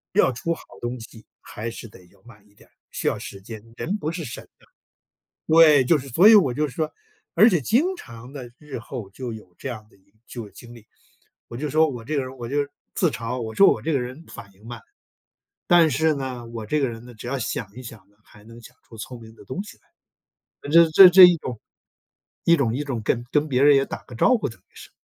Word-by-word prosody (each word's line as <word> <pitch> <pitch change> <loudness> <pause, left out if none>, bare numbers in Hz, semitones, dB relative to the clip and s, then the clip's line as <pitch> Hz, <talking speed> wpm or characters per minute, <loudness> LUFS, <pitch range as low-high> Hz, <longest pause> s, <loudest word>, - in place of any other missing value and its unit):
要 - - +4
出 165 +7 -3
好 - - -11 0.2
东 120 +1 -4
西， 115 -1 -13 0.2
还 110 +2 -7
是 115 0 -9
得 95 -3 -17
要 95 +2 -27
慢 105 -4 -18
一 100 - -29
点， - - -22 0.2
需 - - -4
要 - - 0
时 100 - -9
间， 110 +2 -10 0.2
人 195 +6 -3
不 155 -6 -4
是 165 0 -6
神 115 - -9
的 - - -23 0.8
对， 155 -4 +6
就 160 +5 +4
是 140 -1 -9
所 170 - +5
以 225 - +9
我 155 -12 +4
就 150 +4 -1
是 125 - -12
说， 155 -1 -2 0.4
而 220 - +7
且 175 -7 +1
经 290 - +1
常 125 - -12
地 125 -4 -9
日 150 -3 -8
后 115 -3 -8
就 125 +3 -7
有 100 -5 -13
这 135 - -6
样 110 -4 -8
的 - - -25
一 100 +1 -34
就 120 - -7
有 105 - -12
经 120 0 -14
历。 115 -2 -16 0.6
我 - - -10
就 150 +3 -4
说 155 +1 +3
我 120 -4 -7
这 150 +7 -4
个 - - +1
人 130 - -6
儿 - - -14
我 120 -1 -7
就 145 +1 -1 0.3
自 175 - +1
嘲， 125 -2 -5
我 110 -1 -6
说 195 - +6
我 - - -2
这 160 - -2
个 140 - +1
人 130 +6 -7
反 100 - -12
应 105 +4 -18
慢。 120 -2 -8 0.9
但 170 -2 +5
是 160 +4 +2
呢， 130 -4 -6
我 115 -2 -7
这 150 +8 -1
个 135 - +1
人 115 0 -10
呢， 125 - -12
只 110 +1 -10
要 135 +2 -2
想 115 -3 -4
一 130 - -10
想 110 -5 -12
呢， 105 - -32
还 105 - -19
能 115 +2 -14
想 120 +2 -16
出 115 - -15
聪 120 +2 -9
明 110 0 -14
的 - - -16
东 130 - -5
西 210 - -14
来。 - - -38 0.8
那 - - -7
这 165 +1 +6
这 185 +4 +9
这 185 +1 +10
一 180 -1 +7
种， 125 -7 -7 0.8
一 170 - +5
种 120 -7 0
一 145 - -3
种 125 -6 -4
跟 120 +3 -1
跟 150 +1 +1
别 130 -2 +1
人 145 0 +6
也 135 - +2
打 - - -7
个 125 - -13
招 250 - +3
呼， 215 - -3
等 115 - -14
于 - - -42
是。 - - -13
125 Hz, 275 characters per minute, -23 LUFS, 115-155 Hz, 0.9 s, 这